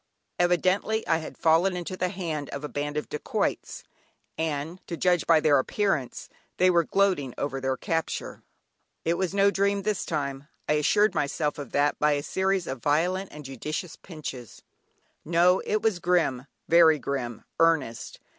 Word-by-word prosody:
Evidently 185 +5 +1
I 165 -1 +2
had 155 - -9
fallen 170 +3 +3
into 180 +1 -5
the 180 0 -1
hands 165 -7 -4
of 140 - -5
a - - -2
band 145 +1 -4
of 150 - -3
dacoits, 150 - -3 0.5
and 160 +2 -3
to 170 - -4
judge 180 -2 +2
by 165 -2 +6
their 150 -3 +4
appearance, 155 - -1 0.3
they 185 0 +4
were 170 -1 +4
gloating 180 -11 +1
over 135 -1 -3
their 130 0 -1
capture. 165 +3 -3 0.6
It 165 - +2
was 185 +2 -2
no 200 0 +4
dream 200 0 +1
this 210 -2 -1
time 140 -2 -3 0.2
I - - +2
assured 205 +8 +3
myself 150 +1 -1
of 140 -4 -7
that 145 +1 +1
by 150 0 +3
a 145 0 -1
series 190 +1 0
of 130 -5 -5
violent 180 +8 0
and 150 -1 -10
judicious 150 +6 -5
pinches; 135 - -9 0.6
no! 175 +3 +4
it 215 +1 0
was 220 -5 +1
grim, 165 -8 +1 0.2
very 165 -1 +6
grim, 130 -5 -4 0.2
earnest. 160 -9 +1
160 Hz, 165 wpm, -26 LUFS, 145-185 Hz, 0.6 s, by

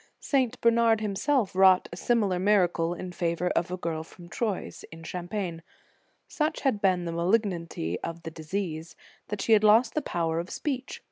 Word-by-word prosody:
St. 255 -4 0
Bernard 230 -1 +4
himself 215 +2 0
wrought 190 -1 +5
a - - -4
similar 200 -3 +1
mir 195 -1 +4
acle 170 0 -2
in 185 - -6
favor 175 0 -1
of 175 - 0
a 185 - -3
girl 165 -3 -3
from 170 +2 -13
Troyes, 210 -1 -3
in 165 0 -11
Cham 175 +1 -6
pagne. 180 -5 -4 0.7
Such 310 +1 -1
had 260 -8 0
been 185 -3 +2
the 170 - -3
malignity 170 - -1
of 165 0 -6
the 160 - -6
disease, 160 0 -5 0.3
that 210 -1 -3
she 225 - +4
had 215 -1 +5
lost 225 +3 +5
the 305 - 0
power 165 - -1
of 175 +2 -5
speech. 270 -3 -4
185 Hz, 185 wpm, -27 LUFS, 170-220 Hz, 0.7 s, wrought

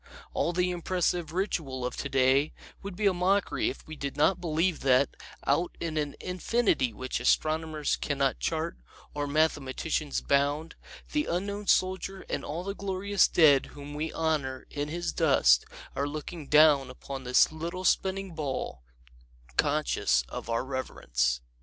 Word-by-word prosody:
All 170 - +1
the 180 +1 +1
impressive 175 -2 -1
ritual 160 -8 -2
of 125 - -3
today 135 +1 +2 0.3
would 195 -2 -7
be 210 +3 -2
a 195 - +5
mockery 185 +3 +1
if - - -8
we 155 - -8
did 140 -1 -5
not 175 +5 +3
believe 165 0 0
that, 130 +1 +3 0.3
out 165 +6 +1
in 165 -2 -3
an 145 -2 -2
infinity 185 - +1
which 130 +5 -4
astronomers 155 -1 +1
can 145 - -2
not 135 -1 +1
chart 165 +1 -2 0.4
or 145 0 -2
mathematicians 150 0 0
bound, 145 +3 +1 0.4
the 300 0 +1
Unknown 200 +4 -3
Soldier 190 +1 +1
and - - -2
all 165 +4 -4
the 200 +1 -3
glorious 200 0 +1
dead 145 -5 +5
whom 145 0 -10
we 155 +2 -3
honor 150 -5 -1
in 145 0 -3
his 170 +2 -3
dust 65 - +4 0.3
are 140 +1 0
looking 155 +1 -6
down 150 -3 +6
upon 135 +1 -7
this 125 +3 +4
little 170 +4 -5
spinning 190 -1 +1
ball, 140 - -4 0.7
conscious - - +2
of - - -7
our 115 +2 0
reverence. 65 - -1
155 Hz, 150 wpm, -28 LUFS, 140-180 Hz, 0.7 s, down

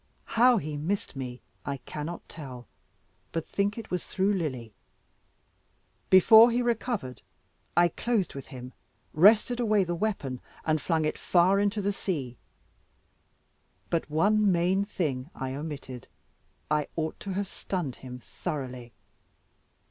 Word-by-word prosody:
How 245 +1 +6
he 150 -4 -3
missed 170 +3 -2
me 125 -2 -6 0.2
I 140 -1 -3
cannot 150 +6 -7
tell, 130 -6 -9 0.7
but 165 -1 -3
think 200 +2 0
it 230 - -8
was 180 -1 -1
through 195 +1 0
Lily. 130 - -3 1.4
Before 220 +5 +8
he 240 +1 +1
recovered, 225 - -2 0.6
I 175 0 +6
closed 220 -2 -1
with 135 -1 -8
him, 125 0 -9 0.4
wrested 215 +8 +5
away 215 -4 +3
the 175 -1 -2
weapon 165 - -2 0.2
and 155 -1 +1
flung 160 -3 +1
it 155 - -2
far 185 +3 +4
into 205 0 0
the 200 +1 +1
sea. 140 -12 -3 1.6
But 165 -2 0
one 205 +6 +3
main 180 +3 +2
thing 150 -9 -2
I 130 -1 -4
omitted; 140 -4 -6 0.6
I 150 -1 +2
ought 160 -1 -3
to 195 - -5
have 200 +1 -2
stunned 175 -9 -4
him 125 -1 -8
thoroughly. 125 -3 -6
170 Hz, 135 wpm, -28 LUFS, 135-200 Hz, 1.6 s, Before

